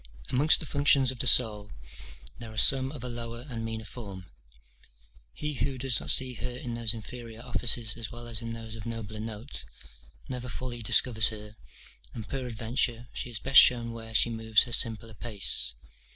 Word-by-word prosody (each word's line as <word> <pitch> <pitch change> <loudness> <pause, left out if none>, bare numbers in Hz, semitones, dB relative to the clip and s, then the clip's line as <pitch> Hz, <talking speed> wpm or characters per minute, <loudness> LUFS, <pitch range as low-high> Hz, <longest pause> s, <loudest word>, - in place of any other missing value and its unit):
Amongst 145 +5 +5
the - - -5
functions 140 -2 +3
of 130 - -11
the 130 - +2
soul, 105 -4 +5 0.7
there 115 -2 -8
are 110 - -12
some 130 +4 +4
of 140 -5 -9
a - - -3
lower 120 0 -6
and 115 -4 -6
meaner 110 -1 -5
form; 100 -6 -9 1.1
he 150 - -5
who 135 0 -3
does 130 -1 +1
not - - -7
see 130 -1 +5
her 125 - -5
in 125 -1 -6
those 115 -1 0
inferior 115 0 -9
offices 115 -1 +1
as 115 -2 -6
well 120 0 -9
as 115 -1 0
in 115 0 -6
those 115 -1 -8
of 110 0 -8
nobler 110 -2 -6
note, 110 +4 -6 0.6
never 125 -1 -5
fully 120 0 -6
discovers 110 0 +4
her; 105 -1 -6 0.6
and, 110 -3 -7
peradventure, 120 -1 -3
she - - -5
is 120 - -3
best 135 +4 +8
shown 120 -2 +2
where 115 -1 -9
she 120 - +3
moves 110 -1 +2
her 120 - -4
simpler 115 -1 0
pace. 105 -4 0
115 Hz, 180 wpm, -28 LUFS, 110-125 Hz, 1.1 s, best